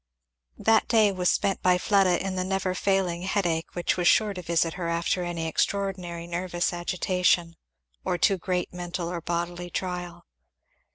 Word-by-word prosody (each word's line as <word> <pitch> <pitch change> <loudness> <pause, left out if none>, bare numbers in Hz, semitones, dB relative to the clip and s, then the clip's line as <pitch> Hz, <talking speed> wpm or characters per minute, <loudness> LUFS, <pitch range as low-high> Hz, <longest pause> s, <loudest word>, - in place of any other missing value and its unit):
That 225 0 +3
day 220 -3 +4
was 180 -2 +1
spent 195 -2 +1
by 180 0 +4
Fleda 190 -2 +3
in 195 - -2
the 185 - 0
never 190 0 -1
failing 185 -2 0
headache 175 -4 -1
which 175 +1 0
was 175 -1 +2
sure 210 +5 +4
to 180 - -6
visit 165 -1 +1
her 175 -2 -4
after 170 +2 0
any 170 -2 -3
extraordinary 180 -1 -2
nervous 175 +1 -2
agitation 175 -1 +1 0.5
or 180 - 0
too 190 +3 +2
great 180 0 -2
mental 175 -1 -4
or 175 -1 -4
bodily 175 +1 -3
trial. 175 -1 -5
180 Hz, 160 wpm, -26 LUFS, 170-190 Hz, 0.5 s, day